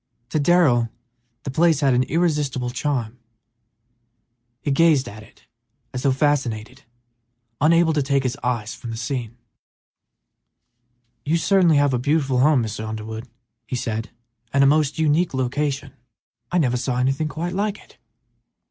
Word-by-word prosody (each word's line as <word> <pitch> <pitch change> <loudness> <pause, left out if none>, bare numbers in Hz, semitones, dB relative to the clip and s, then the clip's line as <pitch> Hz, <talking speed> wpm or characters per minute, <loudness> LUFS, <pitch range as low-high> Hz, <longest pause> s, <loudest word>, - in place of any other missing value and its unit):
To 155 - 0
Darrell 140 -8 +3 0.5
the 135 - -4
place 160 +1 +3
had 135 -2 +3
an 125 - +3
irresistible 145 -4 0
charm; 125 -4 -2 1.4
he 145 - 0
gazed 150 -2 +3
at 110 +1 -9
it 110 - -19 0.5
as 125 - -3
though 135 - +2
fascinated, 130 -3 -1 0.8
unable 165 +1 +4
to 150 - +1
take 140 0 +1
his 130 0 -1
eyes 120 -4 -2
from 120 - -9
the 115 - -5
scene. 120 -1 -4 1.9
"You 160 +3 +1
certainly 175 -3 +3
have 145 -1 +3
a 125 - +1
beautiful 135 -1 +1
home, 140 -2 +4
Mr. 110 0 -5
Underwood," 110 +2 -6 0.4
he 125 - -3
said, 115 -2 -3 0.4
"and 140 0 +3
a - - +6
most 150 +1 +2
unique 160 0 +1
location. 135 +1 -2 0.6
I 180 - +1
never 125 -7 +2
saw 125 0 -2
anything 135 +4 0
quite 165 +4 -4
like 205 +2 -1
it." - - -20
135 Hz, 145 wpm, -22 LUFS, 125-155 Hz, 1.9 s, a